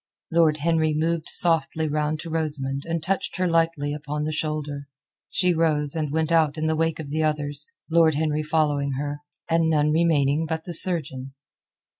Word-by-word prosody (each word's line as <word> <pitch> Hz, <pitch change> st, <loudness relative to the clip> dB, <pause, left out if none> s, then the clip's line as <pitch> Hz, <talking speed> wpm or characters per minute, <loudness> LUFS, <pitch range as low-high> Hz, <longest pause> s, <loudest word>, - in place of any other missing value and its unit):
Lord 165 Hz, -2 st, +3 dB
Henry 160 Hz, 0 st, +1 dB
moved 165 Hz, +1 st, -1 dB
softly 160 Hz, -2 st, +3 dB
round 150 Hz, +1 st, -1 dB
to 165 Hz, -, -8 dB
Rosamund 145 Hz, -3 st, -2 dB
and 165 Hz, -1 st, -2 dB
touched 190 Hz, +2 st, -2 dB
her 185 Hz, 0 st, +1 dB
lightly 165 Hz, -3 st, 0 dB
upon 150 Hz, 0 st, -4 dB
the 155 Hz, -, -2 dB
shoulder. 150 Hz, -2 st, -4 dB, 0.4 s
She 180 Hz, -2 st, +2 dB
rose 155 Hz, -3 st, +1 dB
and 155 Hz, -3 st, -2 dB
went 160 Hz, +1 st, -1 dB
out 160 Hz, -2 st, +2 dB
in 155 Hz, -, -2 dB
the 160 Hz, 0 st, +1 dB
wake 165 Hz, 0 st, 0 dB
of 150 Hz, -3 st, -7 dB
the 155 Hz, +1 st, -1 dB
others, 150 Hz, -, -2 dB
Lord 160 Hz, -2 st, +3 dB
Henry 155 Hz, 0 st, 0 dB
following 150 Hz, -3 st, 0 dB
her, 145 Hz, +2 st, -4 dB, 0.3 s
and 165 Hz, 0 st, +2 dB
none 150 Hz, -1 st, +2 dB
remaining 160 Hz, -2 st, +2 dB
but 160 Hz, 0 st, -3 dB
the 175 Hz, -, -6 dB
surgeon. 135 Hz, -7 st, +1 dB
155 Hz, 175 wpm, -24 LUFS, 150-165 Hz, 0.4 s, Lord